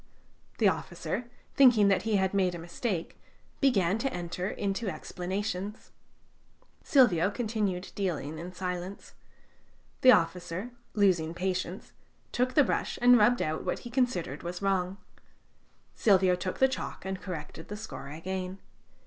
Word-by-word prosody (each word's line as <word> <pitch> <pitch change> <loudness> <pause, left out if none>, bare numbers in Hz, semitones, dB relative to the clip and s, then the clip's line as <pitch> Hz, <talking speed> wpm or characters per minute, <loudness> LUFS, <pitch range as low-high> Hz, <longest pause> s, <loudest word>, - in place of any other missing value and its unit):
The - - +4
officer, 240 -1 -2 0.2
thinking 245 -7 +6
that 195 - +3
he 220 -1 0
had 190 -1 +1
made 185 -3 +2
a - - -5
mistake, 170 +2 -4 0.4
began 205 -7 +3
to 270 +3 -1
enter 180 +2 -3
into 200 +1 -2
explanations. 190 +3 -4 0.9
Silvio 205 - +4
continued 210 -5 -2
dealing 160 -6 -3
in 175 +2 -6
silence. 180 +1 -5 0.9
The 255 - +9
officer, 180 +4 +1 0.2
losing 175 -6 +2
patience, 185 +1 -3 0.4
took 255 +1 0
the 295 - +7
brush - - -1
and 245 +1 +7
rubbed 240 +4 +4
out 155 0 -2
what - - -2
he 240 - -7
considered 230 - 0
was 175 +1 -5
wrong. 195 -1 0 1.0
Silvio 190 -3 +4
took 185 +1 -3
the 265 - +5
chalk 260 -6 -5
and 190 -1 -4
corrected 160 -3 -7
the 210 - -6
score 175 - -8
again. 185 +5 -5
190 Hz, 135 wpm, -29 LUFS, 180-215 Hz, 1.0 s, The